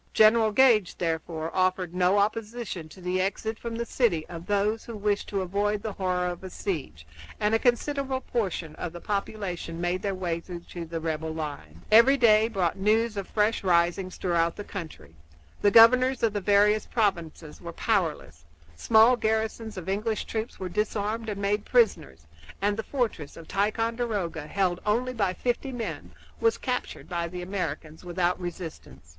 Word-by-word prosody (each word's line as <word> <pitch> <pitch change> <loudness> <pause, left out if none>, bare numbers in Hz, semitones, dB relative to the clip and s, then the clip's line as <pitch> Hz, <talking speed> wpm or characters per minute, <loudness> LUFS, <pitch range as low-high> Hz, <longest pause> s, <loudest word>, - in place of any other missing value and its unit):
General 220 0 +5
Gage, 220 -5 +4
therefore, 160 -1 -3
offered 185 -1 +1
no 180 +2 +3
opposition 210 -4 -2
to 185 - -14
the 180 +1 0
exit 220 +3 -2
from 230 -1 -5
the 235 +1 -2
city 205 -11 +1
of 170 -1 -9
those 205 +2 +1
who 230 -2 -7
wished 205 0 -1
to 195 -2 -1
avoid 205 +3 -1
the 220 - -3
horror 180 -2 -1
of 175 0 -4
a 190 - -6
siege, 155 - -5 0.3
and 210 +1 +1
a 225 - +4
considerable 265 +2 0
portion 190 - -3
of 175 - -5
the 175 - -7
population 195 -4 -4
made 175 +1 -1
their 200 -2 -2
way 175 -3 -2
through 175 0 -8
to 170 0 -8
the 165 0 -4
rebel 160 0 -3
lines. 145 - -7
Every 235 +6 +7
day 220 -3 +5
brought 190 -7 -1
news 215 +3 +2
of 200 -2 -4
fresh 210 +1 +1
risings 180 +1 +1
throughout 170 -2 +1
the 205 - -6
country; 160 - -8 0.5
the 205 - +5
governors 255 +5 +6
of 225 -2 +3
the 205 - -2
various 205 +2 +3
provinces 170 -8 -2
were 170 - -6
powerless; 160 - -1 0.3
small 225 - +5
garrisons 220 -1 -2
of 180 -1 -7
English 210 +3 -1
troops 220 +1 -4
were 190 - -3
disarmed 215 +3 -2
and 205 -1 -4
made 205 +1 0
prisoners; 185 - +1 0.3
and 205 +1 +1
the 220 - -2
fortress 220 - -3
of 165 - -11
Ticonderoga, 210 -5 -1
held 180 0 0
only 240 +5 0
by 200 -6 0
fifty 250 +2 -2
men, 240 -3 -5 0.3
was 455 0 +2
captured 250 -1 -4
by 170 -2 -2
the 180 +1 -6
Americans 165 -4 -4
without 180 0 0
resistance. 160 - -8
200 Hz, 170 wpm, -27 LUFS, 175-220 Hz, 0.5 s, Every